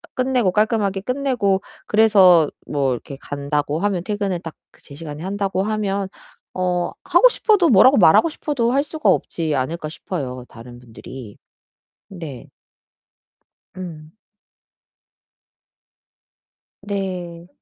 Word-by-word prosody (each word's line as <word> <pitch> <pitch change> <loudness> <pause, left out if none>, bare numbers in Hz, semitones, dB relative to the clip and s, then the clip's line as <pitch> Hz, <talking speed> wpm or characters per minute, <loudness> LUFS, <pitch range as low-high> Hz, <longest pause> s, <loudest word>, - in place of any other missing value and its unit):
끝내고 255 -6 +1
깔끔하게 210 -1 +1
끝내고 245 -5 0 0.3
그래서 195 -7 +5 0.2
뭐 140 -3 0
이렇게 125 +3 -5
간다고 145 +1 -2
하면 195 -2 -1
퇴근을 200 -3 -2
딱 165 -2 -8 0.2
그 - - -24
제시간에 150 +1 -9
한다고 195 -1 -1
하면 200 -2 -2 0.5
어 180 -1 -1
하고 365 +8 +6
싶어도 415 -8 +2
뭐라고 255 +4 +6
말하고 175 - +6
싶어도 275 -6 -1
할 280 +1 +2
수가 310 +1 -4
없지 160 -3 0
않을까 155 +5 -3
싶어요, 135 -6 -6
다른 120 +1 -12
분들이. 120 -1 -11 0.7
네. 160 -9 -9 1.3
음. 160 -2 -9 2.7
네. 180 -4 -5
185 Hz, 240 characters per minute, -21 LUFS, 155-215 Hz, 2.7 s, 하고